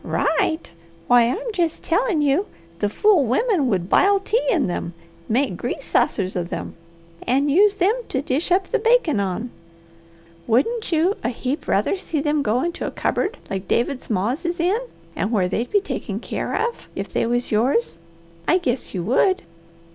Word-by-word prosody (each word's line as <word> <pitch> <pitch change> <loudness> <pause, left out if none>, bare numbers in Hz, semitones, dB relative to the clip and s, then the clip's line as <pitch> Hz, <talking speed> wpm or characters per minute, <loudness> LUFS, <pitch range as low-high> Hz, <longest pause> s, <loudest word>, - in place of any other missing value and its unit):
"Right! 320 - 0 0.3
Why, 245 -1 +5
I'm 470 - -3
jest 335 -4 -1
tellin' 355 -3 +1
you 290 +8 +2 0.3
the 205 - +1
fool 390 - +4
wimmen 290 - +1
would 185 -6 0
bile 395 - +4
tea 440 +5 0
in 340 - +2
them, 175 -1 -4 0.3
make 260 +5 +1
grease - - -4
sassers 190 -3 +1
of 175 -1 -2
them, - - -5 0.5
and 275 +3 +2
use 400 +6 +5
them 400 +2 +3 0.2
to 265 - -1
dish 295 +6 -1
up 370 +1 +3
the - - +2
bakin' 450 - +3
on! 200 +5 -2 1.0
Wouldn't 360 - +1
you 340 +5 +2
a 235 - +1
heap 255 +4 -4
rather - - +1
see 335 -5 -3
them 295 +1 +1
go 240 0 +1
into 345 0 -3
a - - -1
cupboard 430 +6 -1
like 195 -1 -4
David's 250 +3 -1
ma's 225 - -1
is 345 0 -2
in, 365 +7 +2 0.5
where 200 -6 +1
they'd 225 +6 -2
be 410 - +3
taken 400 - -4
keer - - -4
of, 465 +2 -2
if - - -5
they - - +1
was 240 +1 -1
yours? 245 - +1 0.5
I 360 - +5
guess 255 - -2
you 175 - -2
would!" 270 - +2
290 Hz, 175 wpm, -22 LUFS, 235-390 Hz, 1.0 s, Why